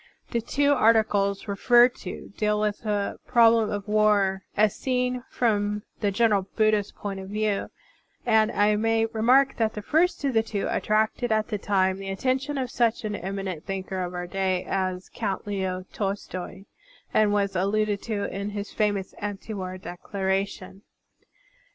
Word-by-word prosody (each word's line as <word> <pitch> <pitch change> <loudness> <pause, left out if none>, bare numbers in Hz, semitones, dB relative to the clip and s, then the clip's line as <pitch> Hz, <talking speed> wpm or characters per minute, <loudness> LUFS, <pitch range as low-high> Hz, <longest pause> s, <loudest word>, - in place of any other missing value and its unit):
The 235 - 0
two 285 +5 +2
articles 215 -5 +2
referred 240 +4 +5
to 190 - -8
deal 210 -1 +1
with 210 -1 0
the 205 -2 -2
problem 230 -2 +5
of 205 0 -4
war 210 -2 +3 0.2
as 210 0 +3
seen 250 -1 -1
from 210 -3 0 0.2
the 205 - +1
general 200 -2 +2
Buddhist 215 -2 +2
point 200 -1 -5
of 190 0 -8
view; 210 -1 -1 0.6
and 220 -1 +4
I 210 -1 +3
may 225 +1 +2
remark 245 +5 +3
that 225 -1 0
the 210 - -5
first 325 - +1
of 270 - +1
the 225 - +4
two 215 -3 -3
attracted 220 +3 0
at 215 0 +1
the 210 - -2
time 190 -1 +1
the 195 0 -6
attention 260 +8 -1
of 255 -2 -2
such 230 -2 +1
an 210 -1 -2
eminent 190 -3 -5
thinker 190 -1 -3
of 180 0 -4
our 180 0 -3
day 185 0 -1
as 185 -1 -2
Count 200 -4 -3
Leo 190 -2 -3
Tolstoy 195 -2 -4 0.5
and 215 -1 +4
was 200 -1 0
alluded 205 +2 +1
to 210 -3 -3
in 200 +1 -3
his 205 0 -5
famous 205 -3 0
anti 205 +1 -5
war 185 -2 -5
declaration. 190 +1 -3
210 Hz, 160 wpm, -26 LUFS, 195-225 Hz, 0.6 s, referred